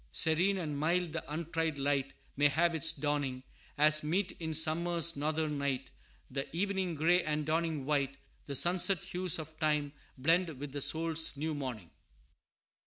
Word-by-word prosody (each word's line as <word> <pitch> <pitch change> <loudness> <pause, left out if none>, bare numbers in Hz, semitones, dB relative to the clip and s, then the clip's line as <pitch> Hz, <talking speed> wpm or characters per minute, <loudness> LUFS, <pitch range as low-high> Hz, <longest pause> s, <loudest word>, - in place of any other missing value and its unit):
Serene 165 - +3
and 150 -5 -3
mild 170 +2 +1
the 160 -3 -5
untried 165 -1 -2
light 140 -1 -1 0.2
May 145 +1 +5
have 170 +4 +2
its 160 0 +5
dawning; 145 -4 -2 0.3
As 155 +1 +5
meet 185 +5 0
in 160 -2 -3
summer's 170 +1 +2
northern 150 0 -1
night 135 -2 -2 0.4
The 135 +1 -3
evening 190 -2 -1
gray 170 +4 +3
and 150 0 -1
dawning 160 -2 -1
white, 140 -2 0 0.3
The 140 - -3
sunset 180 +4 +3
hues 180 -1 -1
of 155 -1 -9
Time 150 -2 0 0.2
blend 165 +3 +1
with 140 +1 -6
the 145 +1 -5
soul's 160 0 0
new 155 +2 -2
morning. 125 - -6
155 Hz, 155 wpm, -32 LUFS, 145-170 Hz, 0.4 s, May